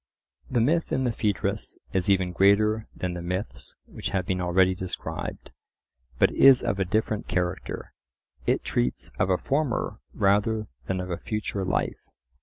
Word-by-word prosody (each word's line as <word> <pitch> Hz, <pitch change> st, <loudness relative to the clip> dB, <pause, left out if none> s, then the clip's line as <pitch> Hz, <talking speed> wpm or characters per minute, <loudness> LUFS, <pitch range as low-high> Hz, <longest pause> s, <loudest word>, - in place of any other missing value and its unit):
The 120 Hz, -2 st, +2 dB
myth 165 Hz, +8 st, +2 dB
in 130 Hz, -, +1 dB
the 125 Hz, -, +1 dB
Phaedrus 105 Hz, -3 st, -1 dB, 0.2 s
is 95 Hz, 0 st, +1 dB
even 95 Hz, -2 st, +3 dB
greater 105 Hz, +4 st, +3 dB
than 90 Hz, -1 st, -3 dB
the 90 Hz, -, -5 dB
myths 90 Hz, +4 st, -4 dB
which -, -, -5 dB
have 95 Hz, -2 st, -1 dB
been 90 Hz, 0 st, -1 dB
already 90 Hz, +1 st, +3 dB
described, 90 Hz, -3 st, -5 dB, 0.7 s
but -, -, +4 dB
is 135 Hz, -2 st, +7 dB
of 115 Hz, -5 st, -1 dB
a 95 Hz, -, +2 dB
different 110 Hz, +2 st, -1 dB
character. 90 Hz, 0 st, -3 dB, 0.5 s
It -, -, +2 dB
treats 60 Hz, +1 st, -1 dB
of 95 Hz, -, +2 dB
a 90 Hz, -, +3 dB
former 140 Hz, +2 st, -1 dB, 0.2 s
rather 105 Hz, +2 st, +2 dB, 0.2 s
than 95 Hz, -1 st, -1 dB
of 90 Hz, 0 st, -5 dB
a 85 Hz, -, -2 dB
future 105 Hz, -3 st, -3 dB
life. 95 Hz, -, -1 dB
95 Hz, 160 wpm, -26 LUFS, 90-110 Hz, 0.7 s, is